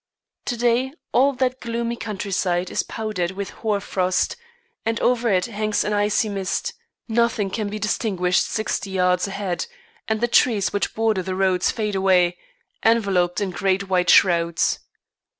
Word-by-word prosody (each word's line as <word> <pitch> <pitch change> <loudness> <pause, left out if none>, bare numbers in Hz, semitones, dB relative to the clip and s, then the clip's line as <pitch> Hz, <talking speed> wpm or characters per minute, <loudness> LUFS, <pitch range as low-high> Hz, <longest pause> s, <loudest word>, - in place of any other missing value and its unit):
To 240 - -2
day 245 +3 +1 0.2
all 275 +3 +4
that 255 0 -1
gloomy 235 0 -3
countryside 190 -5 -2
is - - +1
powdered 210 -6 -3
with 200 +1 -5
hoar 215 -3 +1
frost 185 -2 0 0.5
and 225 0 -1
over 245 -1 +2
it 185 -3 +2
hangs 215 -2 -1
an 210 - -1
icy 205 +1 +2
mist; 195 -2 -2 0.3
nothing 225 -3 +1
can 215 -1 -2
be 210 - -4
distinguished 195 -4 +1
sixty 215 -2 -2
yards 180 0 +1
ahead, 195 -3 -3 0.4
and 220 -1 0
the 240 - +1
trees 225 -4 +3
which 205 - -1
border 220 -3 +1
the 185 +1 -4
roads 185 -1 +2
fade 210 -2 -2
away, 185 -2 +3 0.4
enveloped 200 -6 +2
in 195 -2 -1
great 190 +3 0
white 180 -2 +2
shrouds. 170 -2 +4
205 Hz, 150 wpm, -22 LUFS, 185-225 Hz, 0.5 s, all